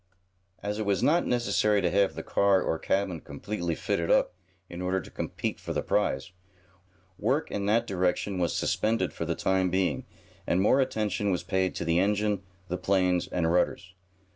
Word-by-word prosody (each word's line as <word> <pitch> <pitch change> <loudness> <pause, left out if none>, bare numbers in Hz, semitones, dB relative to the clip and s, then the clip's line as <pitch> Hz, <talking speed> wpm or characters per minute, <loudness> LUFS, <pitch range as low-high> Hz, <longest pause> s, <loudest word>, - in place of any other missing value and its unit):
As 105 +1 -2
it 110 - -1
was 100 - +1
not 170 +4 +3
necessary 110 -4 +2
to 90 -3 +1
have 100 +1 +2
the - - -5
car, 100 -1 +3
or 80 -3 -1
cabin, 95 -5 -1
completely 85 -6 -4
fitted 85 +1 -1
up - - +3 0.3
in 85 +1 -7
order 90 +1 0
to 90 - -11
compete - - -4
for - - -5
the - - -1
prize, 65 +7 0 0.9
work 130 +8 0
in 100 0 -2
that 115 +3 +3
direction 95 +1 -1
was 85 -2 0
suspended 110 -4 0
for 85 - -4
the 85 0 -1
time 95 +1 +1
being, 95 +1 0 0.4
and 90 - +2
more 120 +8 +4
attention 105 -5 -1
was 90 -2 0
paid 95 0 0
to - - -3
the 85 +1 +2
engine, 105 0 +1 0.3
the 90 - -2
planes 90 -1 +1
and 80 -2 0
rudders. 90 +1 0
95 Hz, 180 wpm, -28 LUFS, 90-105 Hz, 0.9 s, more